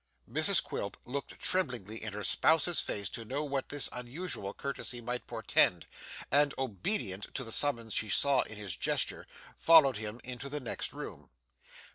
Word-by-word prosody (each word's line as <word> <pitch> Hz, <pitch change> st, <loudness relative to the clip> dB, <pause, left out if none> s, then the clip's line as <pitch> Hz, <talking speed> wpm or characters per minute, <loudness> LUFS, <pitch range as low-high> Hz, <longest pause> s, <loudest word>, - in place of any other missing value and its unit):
Mrs 155 Hz, -, +2 dB
Quilp 100 Hz, -, -4 dB
looked 140 Hz, +3 st, -6 dB
tremblingly 120 Hz, -, 0 dB
in 110 Hz, -2 st, -4 dB
her 105 Hz, 0 st, -5 dB
spouse's 160 Hz, -, +3 dB
face 100 Hz, -2 st, -3 dB
to 115 Hz, -, -5 dB
know 135 Hz, +6 st, -2 dB
what 140 Hz, -2 st, -3 dB
this 145 Hz, -1 st, 0 dB
unusual 125 Hz, -, -5 dB
courtesy 135 Hz, 0 st, -4 dB
might 125 Hz, +1 st, -4 dB
portend, -, -, +4 dB, 0.5 s
and 145 Hz, 0 st, +4 dB
obedient 105 Hz, -, -2 dB
to 130 Hz, -, -1 dB
the 115 Hz, -, -6 dB
summons 115 Hz, -5 st, +1 dB
she 110 Hz, -, 0 dB
saw 140 Hz, +5 st, +4 dB
in 110 Hz, -, -6 dB
his 100 Hz, -5 st, -5 dB
gesture, -, -, 0 dB, 0.3 s
followed 150 Hz, -7 st, +7 dB
him 105 Hz, +2 st, -5 dB
into 125 Hz, +2 st, -6 dB
the 150 Hz, +1 st, -3 dB
next 125 Hz, -, -3 dB
room. -, -, -8 dB
125 Hz, 160 wpm, -31 LUFS, 110-145 Hz, 0.5 s, followed